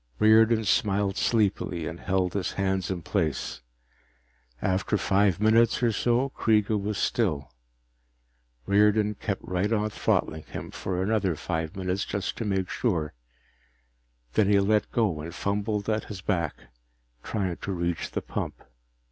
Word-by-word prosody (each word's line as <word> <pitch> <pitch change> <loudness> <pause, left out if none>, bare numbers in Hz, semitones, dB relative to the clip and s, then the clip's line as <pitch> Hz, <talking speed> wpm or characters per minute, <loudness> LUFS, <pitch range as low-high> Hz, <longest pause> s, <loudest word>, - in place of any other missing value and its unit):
Riordan 110 +1 +5
smiled 100 -1 +1
sleepily 100 -7 0
and 85 +1 -5
held 95 -1 0
his 100 -2 -2
hands 95 -1 -1
in 90 -3 -3
place. 75 -4 -2 1.0
After 95 +3 0
five 100 -2 +2
minutes 115 +3 +4
or 120 - +4
so 120 +5 +1
Kreega 110 -4 +2
was 105 0 -2
still. 90 - 0 1.1
Riordan 105 +1 +3
kept 100 -1 -4
right 90 +4 -1
on 105 -1 +1
throttling 80 -5 0
him - - -7
for 95 -1 -2
another 100 -4 +1
five 80 +3 -3
minutes, 95 0 -1
just 100 -2 -3
to 115 - -3
make 95 -3 0
sure. 85 - -1 1.2
Then 100 -2 +3
he 100 -1 +5
let 105 +1 +2
go 105 -10 +1
and 85 +3 -7
fumbled 105 +1 -1
at 110 0 0
his 100 -3 -7
back, 85 -5 -1 0.7
trying 95 - -2
to 100 - -5
reach 85 -2 -2
the - - -4
pump. - - -4
100 Hz, 140 wpm, -27 LUFS, 90-110 Hz, 1.2 s, Riordan